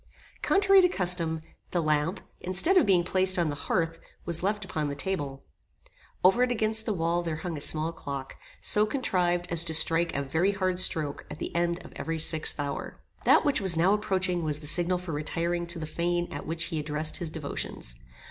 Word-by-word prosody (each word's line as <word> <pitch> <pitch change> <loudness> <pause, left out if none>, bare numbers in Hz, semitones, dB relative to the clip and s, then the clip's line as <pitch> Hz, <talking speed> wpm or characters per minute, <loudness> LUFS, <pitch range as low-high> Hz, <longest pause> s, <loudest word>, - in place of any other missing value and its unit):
Contrary 390 0 +5
to 360 - +4
custom, 175 - 0 0.3
the 175 - -1
lamp, 155 +4 0 0.2
instead 185 - +1
of 350 - +5
being 180 -3 +4
placed 185 +1 +2
on 170 -3 +1
the 145 - -3
hearth, 165 -2 0 0.3
was 170 -1 0
left 205 +2 -1
upon 155 -5 -3
the 140 - -4
table. 145 -4 -4 0.8
Over 195 +7 +5
it 250 0 +2
against 220 -1 +1
the 215 - +1
wall 170 0 0
there 165 -2 -3
hung 175 -2 -3
a 145 - -6
small 155 +2 -1
clock, 140 -4 -7 0.3
so 210 +1 +3
contrived 180 -8 0
as 170 -1 +4
to 160 -1 +1
strike 165 +1 +4
a 140 - -1
very 160 +9 +1
hard 185 -2 -1
stroke 155 -5 +1
at - - -7
the - - -6
end 170 +1 -1
of - - -12
every 165 0 -3
sixth 160 0 +1
hour. 145 -1 -4 0.3
That - - +5
which 290 -6 +2
was 185 -4 +5
now 180 +4 +4
approaching 185 -4 0
was 150 -1 -1
the 150 - -12
signal 175 +4 +3
for 180 -1 -7
retiring 170 +3 -2
to 170 0 -1
the 160 - -4
fane 175 +2 -1
at 145 - -7
which 165 +1 -1
he 160 - -1
addressed 150 +1 -3
his 170 - -4
devotions. 150 - -6
170 Hz, 205 wpm, -27 LUFS, 155-185 Hz, 0.8 s, Contrary